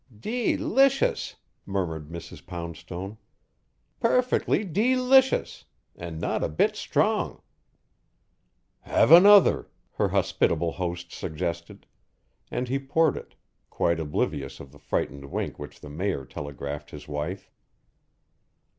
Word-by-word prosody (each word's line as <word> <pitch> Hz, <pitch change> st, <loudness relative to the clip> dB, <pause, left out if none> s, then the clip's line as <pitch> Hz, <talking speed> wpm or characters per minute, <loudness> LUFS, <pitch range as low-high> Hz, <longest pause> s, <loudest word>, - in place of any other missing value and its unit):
"Dee 235 Hz, -, 0 dB
licious," 275 Hz, +2 st, +2 dB, 0.3 s
murmured 80 Hz, -6 st, -3 dB
Mrs. 85 Hz, 0 st, -9 dB
Poundstone. 85 Hz, +4 st, -7 dB, 0.8 s
"Perfectly 245 Hz, -2 st, +2 dB
dee 215 Hz, +8 st, +1 dB
licious. 260 Hz, +1 st, +3 dB, 0.3 s
And 85 Hz, -2 st, -7 dB
not -, -, -1 dB
a -, -, 0 dB
bit 75 Hz, -, +1 dB
strong!" -, -, 0 dB, 1.4 s
"Have -, -, +2 dB
another," 200 Hz, +4 st, +8 dB, 0.2 s
her -, -, 0 dB
hospitable 85 Hz, 0 st, +1 dB
host 85 Hz, -1 st, -4 dB
suggested, 85 Hz, +1 st, -5 dB, 0.6 s
and 125 Hz, +1 st, -2 dB
he 135 Hz, +3 st, 0 dB
poured 145 Hz, +3 st, +2 dB
it, -, -, -10 dB, 0.3 s
quite 85 Hz, -1 st, 0 dB
oblivious 70 Hz, -3 st, -2 dB
of 70 Hz, -, -11 dB
the 70 Hz, -, -17 dB
frightened 70 Hz, -1 st, -3 dB
wink 70 Hz, -, -4 dB
which 75 Hz, -, -9 dB
the 75 Hz, -, -9 dB
mayor 85 Hz, -3 st, -2 dB
telegraphed 70 Hz, +2 st, -6 dB
his 75 Hz, 0 st, -10 dB
wife. 75 Hz, +6 st, -5 dB
85 Hz, 110 wpm, -26 LUFS, -, 1.4 s, another